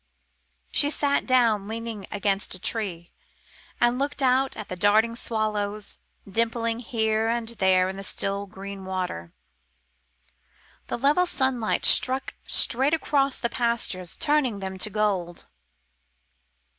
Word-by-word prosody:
She 290 - +4
sat 285 -1 +1
down, 230 -6 +3
leaning 225 -3 -6
against 200 -2 0
a - - -8
tree, 180 -5 -2 0.7
and 240 +1 +2
looked 280 0 -2
out 260 +1 +2
at 215 - -7
the 185 - -5
darting 215 +5 +3
swallows, 215 -3 -2 0.3
dimpling 230 +2 -1
here 220 -2 0
and 230 0 -1
there 190 -4 +2
the 195 +1 -8
still 200 +1 -2
green 195 0 -9
water. 180 - -4 1.6
The - - -2
level 295 +8 +3
sunlight 260 -7 0
struck 260 +2 +4
straight 270 +6 +2
across 275 -4 0
the 235 - 0
pastures, 235 -7 -1
turning 290 -8 +1
them 190 -1 -6
to 215 - +1
gold. 190 -5 -2
220 Hz, 120 wpm, -25 LUFS, 195-245 Hz, 1.6 s, She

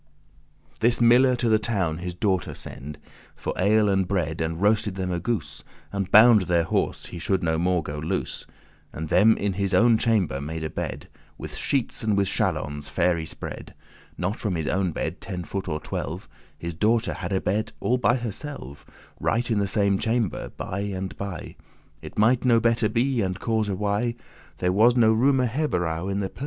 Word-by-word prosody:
This 120 +2 +3
miller 125 +2 +5
to 120 -1 -1
the 110 -1 +4
town 95 -8 -1
his 90 0 -5
daughter 95 0 -1
send 75 +3 -9 0.4
For - - -4
ale 105 +3 +3
and 95 -2 +2
bread, 85 -5 -1
and 80 +1 -2
roasted 105 0 +2
them 95 -1 -2
a 90 - -1
goose, 85 -7 -3 0.3
And 100 -1 -2
bound 110 -2 +7
their 85 -2 +3
horse, 80 - -1
he 85 - -7
should 95 +2 0
no 80 -1 +1
more 90 -1 +1
go 75 0 -5
loose: 75 - -3 0.4
And 80 0 -6
them 110 +1 +5
in 100 -1 -1
his 100 0 0
own 115 -1 +5
chamber 100 - +1
made 80 +2 -5
a 80 - -3
bed. - - -5 0.3
With - - -8
sheetes 135 -5 -1
and 105 -2 +1
with 100 -1 +2
chalons* 75 +1 -2
fair 90 - +2
y 80 -1 -4
spread, - - -8 0.4
*blankets<17> - - -16
Not 95 +4 -1
from 100 -5 -2
his 80 -2 -2
owen 95 -1 0
bed - - -4
ten 90 -2 -5
foot 95 +2 -5
or 75 -3 -2
twelve: - - -5 0.3
His 85 0 -5
daughter 110 +6 +1
had - - -5
a 95 - +2
bed 105 +4 -1
all 125 +1 +1
by 120 0 +3
herselve, 120 - -6 0.4
Right 120 +1 0
in 110 - +2
the 100 - +1
same 100 -1 +1
chamber 115 -4 -1
*by 95 - -4
and 95 -2 -4
by*: 100 - -4
*side - - -5
by 85 - -6
side* - - -11 0.5
It - - -10
might 115 +4 +3
no 120 -3 +5
better 115 -1 +2
be, 120 +3 +1
and 95 -1 -2
cause 110 -2 0
why, 105 +4 -1 0.4
There 90 0 0
was 115 +5 +5
no 110 -3 +5
*roomer 130 +3 +3
herberow* 95 - -1
in 100 +1 -1
the 95 - -2
place. - - -17
100 Hz, 200 wpm, -25 LUFS, 90-115 Hz, 0.5 s, bound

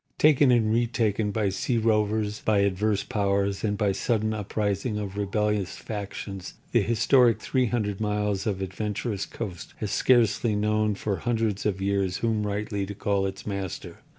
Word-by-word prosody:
Taken 145 -2 +5
and 115 -3 +3
retaken 110 -3 +1
by 105 -1 0
sea 115 +5 -1
rovers, 105 -1 +1
by 105 -2 +3
adverse 100 +1 +1
powers 100 -1 0
and 105 -2 0
by 105 -2 +2
sudden 110 +2 0
uprising 105 +1 -2
of 100 -2 -4
rebellious 105 -1 -1
factions, 100 -3 -6 0.2
the - - +4
historic 115 0 +4
300 110 -5 0
miles 105 -1 -1
of 95 -2 -1
adventurous 105 +2 -3
coast 95 -7 -7
has - - -3
scarcely 115 -3 +3
known 105 0 +1
for 100 -1 -2
hundreds 110 -4 -1
of 95 -2 -1
years 100 -2 0
whom 110 -2 0
rightly 100 0 -2
to 100 - -6
call 100 -1 0
its 95 0 -7
master. 100 -3 -5
105 Hz, 150 wpm, -26 LUFS, 100-110 Hz, 0.2 s, Taken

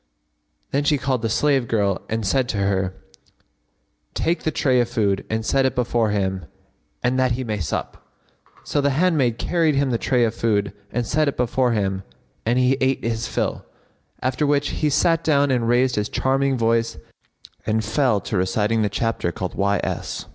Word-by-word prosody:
Then 140 +1 +1
she 150 0 +3
called 130 -3 -1
a 115 - 0
slave 135 +1 +2
girl 100 -4 0
and 110 -1 -2
said 125 +5 +1
to 105 - -2
her, 95 -1 0 1.2
"Take 170 +2 0
the - - 0
tray 130 -4 +2
of 120 - -1
food 100 -5 0
and 110 0 -2
set 135 +3 +2
it 130 0 0
before 120 -3 +1
him 95 -3 -1 0.6
that 130 0 +2
he 130 +2 -3
may 110 -3 -3
sup." 85 - -4 0.6
So 145 - 0
the 140 - +2
handmaid 150 -10 +2
carried 165 -4 +1
him 140 -1 +1
the 115 - 0
tray 125 -2 +2
of 115 -1 +1
food 105 -3 0 0.2
and 120 0 -1
set 155 +6 +1
it 140 - -2
before 125 0 +1
him 95 -3 -1 0.5
and 120 +2 +2
he 130 +1 +3
ate 130 0 +1
his 115 0 -2
fill: - - -2 0.6
after 130 +3 0
which 145 0 +1
he 150 - 0
sat 165 +3 +2
down 145 -3 +3
and 120 -3 +1
raised 125 0 +2
his 105 +1 -1
charming 135 0 +1
voice 115 0 +1 0.7
and 110 0 +1
fell 115 -1 +2
to - - -3
reciting 105 +4 +1
the 105 - +1
chapter 110 -3 -1
called 90 +1 -5
Y. 100 0 +1
S. - - -4
120 Hz, 185 wpm, -22 LUFS, 110-135 Hz, 1.2 s, she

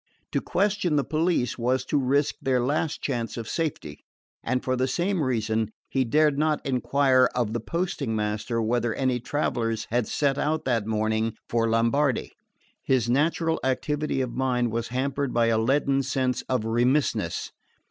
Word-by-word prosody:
To - - 0
question 200 -5 0
the 145 - +2
police 155 -6 0
was 130 +2 0
to 145 - 0
risk 140 +2 +2
their 130 -1 +1
last 145 +5 -1
chance 120 -4 -2
of 115 -1 -5
safety; 140 - -3 0.4
and 130 +1 -1
for 130 - 0
the 130 +1 0
same 180 +5 0
reason 110 -4 0 0.2
he 135 - +2
dared 150 +3 +3
not 155 -1 +2
enquire 130 0 +3
of 120 -3 0
the 120 - -1
posting 160 - -2
master 105 +2 -1
whether 115 0 0
any 130 -2 0
travellers 115 -4 -1
had 120 -1 +1
set 140 -1 0
out 155 +2 0
that 115 -5 0
morning 110 0 0
for 115 -1 +1
Lombardy. 115 +4 +1 0.5
His 120 -3 +1
natural 160 +4 +1
activity 145 +2 -1
of 125 -2 -3
mind 125 -2 0
was 115 +1 -2
hampered 135 +1 -2
by 115 -1 +3
a 110 -1 +2
leaden 135 +3 +2
sense 130 -1 -1
of 125 -4 0
remissness. 125 +6 0
130 Hz, 160 wpm, -26 LUFS, 115-145 Hz, 0.5 s, dared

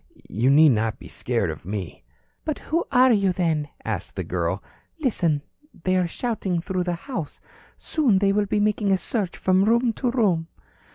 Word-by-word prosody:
You 115 +7 +1
need 150 +3 +7
not 110 -3 +1
be - - -12
scared - - -1
of - - -9
me." 95 -1 -5 0.4
"But 310 - -2
who 330 +3 -1
are 255 -1 +6
you, 200 -4 +3
then?" 165 -5 0 0.2
asked 105 -5 -4
the 95 - -2
girl. 85 +2 -2 0.4
"Listen. 170 - +1 0.4
They 185 0 +2
are 180 -1 +2
shouting 195 -3 -2
through 180 +1 -2
the 175 -1 -1
house. 175 - -6 0.4
Soon 270 -11 +1
they 195 0 +3
will 205 0 +1
be 210 - +1
making 210 -1 +1
a 190 - +4
search 195 -2 -2
from 185 +1 +3
room 235 +1 +3
to 250 +3 -1
room." 195 -10 +1
185 Hz, 180 wpm, -24 LUFS, 150-220 Hz, 0.4 s, need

